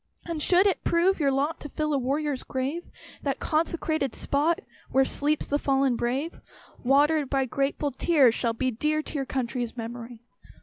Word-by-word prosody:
And 335 -3 -3
should 360 +5 +5
it 395 - +1
prove 345 +3 +2
your 285 -3 +3
lot 280 +4 0
To 295 - -8
fill 305 +1 -1
a - - +3
warrior's 280 +1 -1
grave, 270 +6 -3 0.3
That 275 -2 -2
consecrated 315 -3 -1
spot 310 +4 +1 0.3
Where 270 0 +3
sleeps 295 +3 0
"the 290 - 0
fallen 270 -3 +2
brave," 260 +8 -2 0.4
Watered 285 +2 +3
by 270 -1 +1
grateful 280 +3 -1
tears, 270 -3 +4
shall 235 -1 0
be 255 +3 -1
Dear 305 +6 0
to - - -8
your 275 -3 -2
country's 245 -2 -3
memory. 235 0 -7
280 Hz, 170 wpm, -26 LUFS, 260-310 Hz, 0.4 s, should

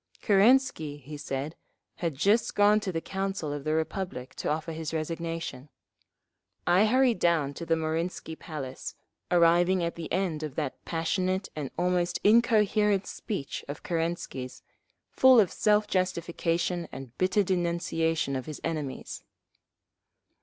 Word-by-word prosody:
Kerensky, 205 - +3
he 145 +2 -9
said, 145 +2 -4 0.4
had 165 -5 -2
just 205 - +2
gone 205 +1 +5
to 200 -3 -3
the 165 -2 -2
Council 190 -6 -3
of 145 -1 -5
the 155 +1 0
Republic 160 -5 -3
to - - -2
offer 155 +2 -2
his 160 0 -4
resignation. 165 -3 -4 1.0
I 180 +5 +5
hurried 255 0 +3
down 160 -5 +2
to 165 +3 -7
the 165 - +3
Marinsky 160 +1 -3
Palace, 135 -5 -7 0.3
arriving 175 +1 +4
at 170 - -1
the 165 -2 -7
end 175 -4 0
of 150 -4 -5
that 150 -4 -4
passionate 185 +3 -1
and 145 -4 -4
almost 175 0 +1
incoherent 210 -3 +4
speech 195 - -5
of 145 - -7
Kerensky's, 165 -6 -3 0.5
full 260 -2 +7
of 200 -5 +3
self 210 0 +3
justification 170 -2 -1
and 130 -3 -9
bitter 185 +3 +3
denunciation 170 -4 0
of 130 +1 -4
his 155 - -6
enemies. 155 -5 -4
170 Hz, 135 wpm, -28 LUFS, 155-190 Hz, 1.0 s, full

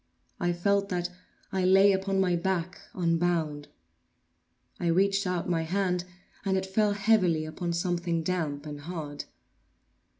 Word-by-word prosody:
I 175 - +1
felt 200 +3 +1
that 180 -1 -2 0.4
I 190 -1 0
lay 195 +2 +6
upon 195 0 0
my 180 -2 +3
back, 185 0 -2
unbound. 165 -4 0 1.1
I 175 - -1
reached 195 +3 +2
out 180 -1 -1
my 170 -2 +1
hand, 180 +1 0 0.4
and 190 -1 +1
it 190 - -1
fell 205 +2 +2
heavily 195 -6 +3
upon 170 +2 -3
something 170 -1 -1
damp 155 -5 -2
and 145 -1 -6
hard. 150 -3 -6
180 Hz, 135 wpm, -28 LUFS, 165-190 Hz, 1.1 s, lay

